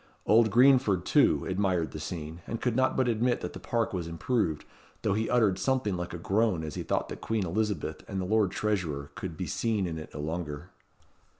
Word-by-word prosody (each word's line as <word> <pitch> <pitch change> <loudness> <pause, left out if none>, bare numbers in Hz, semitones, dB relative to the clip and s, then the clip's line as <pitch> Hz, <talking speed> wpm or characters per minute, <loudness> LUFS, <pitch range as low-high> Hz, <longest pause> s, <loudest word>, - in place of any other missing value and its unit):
Old 110 +1 +5
Greenford, 125 -5 +4
too, - - +3
admired 95 -3 0
the 75 - -6
scene, 80 +1 -6
and 115 - -3
could 125 -3 0
not 130 +1 +2
but 130 -1 +2
admit 120 +1 +1
that - - -5
the - - -7
park 115 -3 -1
was 90 -3 -3
improved, 85 -1 -1 0.4
though 105 - +2
he 110 +2 -1
uttered 110 -6 +3
something 110 -2 +1
like 90 0 -4
a 85 - -5
groan 95 -1 +1
as 75 -2 -5
he - - -4
thought - - -1
that - - -7
Queen 110 -4 -1
Elizabeth 100 -1 -2
and 95 - -3
the 95 - -2
Lord 105 0 +2
Treasurer 85 -9 -2
could 85 -1 -6
be 90 - -3
seen 105 +4 0
in 80 -2 -4
it 80 - -9
no - - -5
longer. 80 +1 -4
95 Hz, 210 wpm, -29 LUFS, 85-110 Hz, 0.4 s, Old